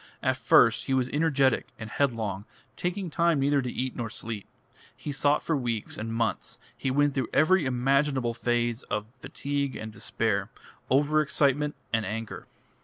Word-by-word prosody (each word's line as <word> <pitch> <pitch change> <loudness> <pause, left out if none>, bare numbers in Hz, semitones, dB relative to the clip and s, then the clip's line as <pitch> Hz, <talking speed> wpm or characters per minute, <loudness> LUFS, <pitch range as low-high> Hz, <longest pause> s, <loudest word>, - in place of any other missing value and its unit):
At 130 -1 +2
first 120 -1 +4
he 135 - +1
was 130 -1 +1
energetic 140 -5 +2
and 110 - -7
headlong, 110 -6 -1 0.3
taking 180 0 -3
time 170 -2 +2
neither 140 +1 +3
to 125 -2 -3
eat 130 +1 -3
nor 115 -3 -3
sleep. 110 -2 -5 0.5
He 150 - -5
sought 145 +1 +2
for 165 - 0
weeks 120 -5 -2
and 115 +1 -4
months, 115 0 -2 0.2
he - - -2
went 145 +2 +2
through 130 -4 -1
every 155 0 +4
imaginable 130 0 +1
phase 120 0 0
of 105 0 -1
fatigue 140 +1 -3
and 110 0 -6
despair, 105 -2 -1 0.4
over 145 +4 +3
excitement 150 0 +1 0.2
and 110 -1 +2
anger. 110 +2 -5
130 Hz, 160 wpm, -27 LUFS, 115-145 Hz, 0.5 s, first